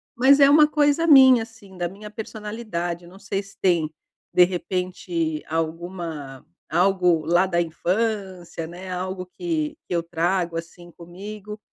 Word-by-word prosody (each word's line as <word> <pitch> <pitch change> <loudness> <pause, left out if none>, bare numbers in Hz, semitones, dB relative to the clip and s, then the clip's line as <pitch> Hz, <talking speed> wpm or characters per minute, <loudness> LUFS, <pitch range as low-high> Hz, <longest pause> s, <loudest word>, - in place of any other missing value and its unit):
Mas 265 +4 +5
é 280 0 +7
uma 300 +1 +7
coisa 295 +1 +2
minha, 260 -5 +8
assim, 225 -4 -15
da 175 -1 -2
minha 205 +3 -10
personalidade, 210 -6 -5
eu - - -13
não 190 +2 -15
sei 195 0 -3
se 195 - -17
tem, 170 -5 +2 0.4
de 180 - +7
repente, 175 -3 -3
alguma 165 -4 -4 0.2
algo 180 -1 +3
lá 175 +3 +3
da 175 -2 +1
infância, 185 0 -2
né, 180 +3 -9
algo 185 +1 -4
que 310 - -3
que - - -4
eu 170 - +1
trago, 170 +1 -1
assim, 170 +1 -9
comigo. 205 +5 -9
185 Hz, 150 wpm, -23 LUFS, 170-215 Hz, 0.4 s, minha